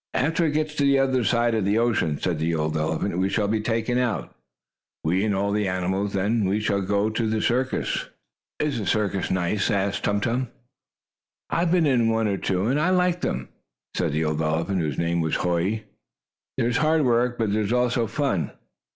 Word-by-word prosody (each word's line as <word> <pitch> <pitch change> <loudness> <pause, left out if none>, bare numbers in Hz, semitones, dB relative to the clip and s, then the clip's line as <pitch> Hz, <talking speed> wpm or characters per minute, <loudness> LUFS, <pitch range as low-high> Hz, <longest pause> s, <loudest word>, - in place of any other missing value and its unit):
"After 160 +5 +1
it 150 - -1
gets 155 0 -1
to 145 - +2
the 140 0 +4
other 130 -2 +2
side 115 +2 +2
of 110 -2 +1
the 100 +3 +1
ocean," 110 -10 +1
said 85 -4 -1
the 80 +1 0
old 75 0 -1
elephant, 80 +4 -1
"we 95 +1 +1
shall 100 +1 0
be 110 +1 0
taken 115 +2 0
out 120 -5 -2 0.7
we 90 +5 +1
and 105 -2 +1
all 100 +1 0
the 105 -1 0
animals. 95 +2 -1
Then 105 +3 +1
we 100 +3 +1
shall 100 -2 0
go 100 +2 0
to 110 0 -1
the 110 0 0
circus." 130 +4 0 0.5
"Is 145 -5 -1
the 105 - -4
circus 100 -3 0
nice?" 95 +2 0
asked 100 0 0
Tum 105 0 +1
Tum. 120 +4 -1 1.0
"I - - +1
have 170 -1 +1
been 175 -3 +3
in 120 -5 +3
one 115 -1 +1
or 100 -1 0
two, 95 +1 -1
and 135 +6 +1
I 165 +4 +2
like 180 -1 +2
them," 65 0 -2 0.5
said - - 0
the 80 +1 0
old 75 0 -1
elephant, 80 +4 0
whose 75 -4 -2
name 85 0 0
was 80 -1 0
Hoy. 90 +5 0 0.7
"There 115 - +1
is 120 - +1
hard 155 0 +2
work, 120 0 +2
but 110 -3 0
there 110 - +1
is 105 +1 -2
also 125 -1 +1
fun." 135 - -1
105 Hz, 210 wpm, -24 LUFS, 95-125 Hz, 1.0 s, the